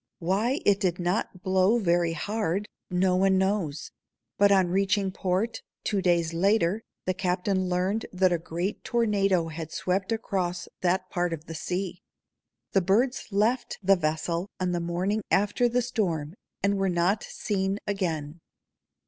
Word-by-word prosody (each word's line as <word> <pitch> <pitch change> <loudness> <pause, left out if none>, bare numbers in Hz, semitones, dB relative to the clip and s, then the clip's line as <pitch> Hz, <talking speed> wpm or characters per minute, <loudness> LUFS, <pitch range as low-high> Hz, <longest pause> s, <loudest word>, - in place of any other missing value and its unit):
Why 205 - 0
it 200 -1 +4
did 180 -2 0
not 180 +1 -2
blow 190 +4 +3
very 175 -5 +2
hard, 205 +1 -2 0.2
no 180 +1 +2
one 190 +1 +3
knows; 190 -6 -1 0.4
but 200 0 +4
on 190 -3 +4
reaching 195 +1 +1
port, 190 +5 -1 0.2
two 200 -2 0
days 170 -2 +2
later, 195 +2 +2 0.2
the 185 - +1
captain 185 0 0
learned 185 +5 0
that 185 -1 +3
a 170 - 0
great 170 +5 -3
tornado 195 -7 +1
had 160 0 -6
swept 190 +3 -1
across 185 -6 -2
that 185 +1 0
part 175 -1 0
of 155 -1 -6
the 165 - -7
sea. 180 +3 -3 0.7
The 195 - +3
birds 235 +9 +1
left 220 +5 +1
the 195 +1 +6
vessel 170 +2 -1
on 185 -1 0
the 175 - 0
morning 180 +5 -1
after 210 +5 +2
the 245 +1 +1
storm 175 -11 -1 0.3
and 200 0 +2
were 195 0 +2
not 180 +4 +2
seen 195 -1 -2
again. 170 -6 -2
185 Hz, 150 wpm, -27 LUFS, 175-200 Hz, 0.7 s, the